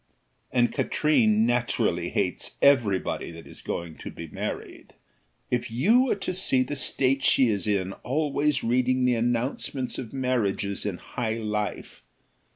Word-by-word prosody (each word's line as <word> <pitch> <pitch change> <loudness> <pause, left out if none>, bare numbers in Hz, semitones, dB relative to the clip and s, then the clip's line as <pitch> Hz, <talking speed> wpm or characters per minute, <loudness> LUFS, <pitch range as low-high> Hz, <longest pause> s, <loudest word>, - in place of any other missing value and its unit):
"And 120 -1 +2
Katrine 115 -8 +2
naturally 120 0 0
hates - - -2
every 120 -9 +4
body - - -4
that 85 0 -11
is - - -10
going 85 -2 -5
to - - -7
be 85 - -8
married. - - -6 0.6
If 120 -1 0
you 210 - +4
were 255 - +1
to 195 -2 -4
see 135 -8 +3
the 145 +3 -4
state 135 +1 +1
she 130 -3 +4
is 100 -2 -1
in 95 -2 0
always 145 +1 0
reading 125 +2 +2
the 125 - +3
announcements 120 +2 -1
of 120 -4 -6
Marriages 105 -7 -1
in 95 -3 -3
High 110 +2 -3
Life! 105 -2 -4
125 Hz, 150 wpm, -26 LUFS, 105-135 Hz, 0.6 s, every